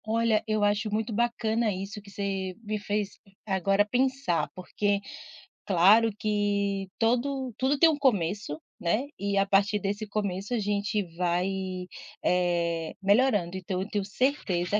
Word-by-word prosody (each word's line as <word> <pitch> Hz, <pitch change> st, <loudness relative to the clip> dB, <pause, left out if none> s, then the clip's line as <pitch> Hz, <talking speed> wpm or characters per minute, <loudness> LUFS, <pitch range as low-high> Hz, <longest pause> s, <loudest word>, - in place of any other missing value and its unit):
Olha, 225 Hz, -1 st, +2 dB
eu 215 Hz, -1 st, +1 dB
acho 205 Hz, +1 st, +1 dB
muito 220 Hz, +2 st, -1 dB
bacana 230 Hz, -1 st, +1 dB
isso 195 Hz, +2 st, -5 dB
que 200 Hz, -, -15 dB
você 195 Hz, -2 st, -3 dB
me 215 Hz, 0 st, -2 dB
fez 205 Hz, 0 st, -3 dB, 0.3 s
agora 195 Hz, 0 st, +2 dB
pensar 255 Hz, -4 st, 0 dB
porque, 200 Hz, +2 st, -1 dB, 0.7 s
claro 205 Hz, +5 st, +5 dB
que 205 Hz, -2 st, 0 dB
todo 250 Hz, +2 st, 0 dB
tudo 270 Hz, +3 st, +1 dB
tem 325 Hz, +4 st, +7 dB
um 310 Hz, -, 0 dB
começo, 205 Hz, -, 0 dB, 0.2 s
né, 215 Hz, +11 st, 0 dB
e 200 Hz, 0 st, -1 dB
a 195 Hz, -, +4 dB
partir 200 Hz, +1 st, +2 dB
desse 205 Hz, +2 st, -2 dB
começo 200 Hz, +1 st, -3 dB
a 240 Hz, -, +1 dB
gente 205 Hz, 0 st, 0 dB
vai, 180 Hz, +1 st, +1 dB, 0.7 s
eh, 170 Hz, -2 st, +1 dB
melhorando 200 Hz, -3 st, +3 dB
então 185 Hz, 0 st, -3 dB
eu 195 Hz, -, -5 dB
tenho 205 Hz, -2 st, -1 dB
certeza 205 Hz, -5 st, 0 dB
205 Hz, 140 wpm, -28 LUFS, 195-225 Hz, 0.7 s, tem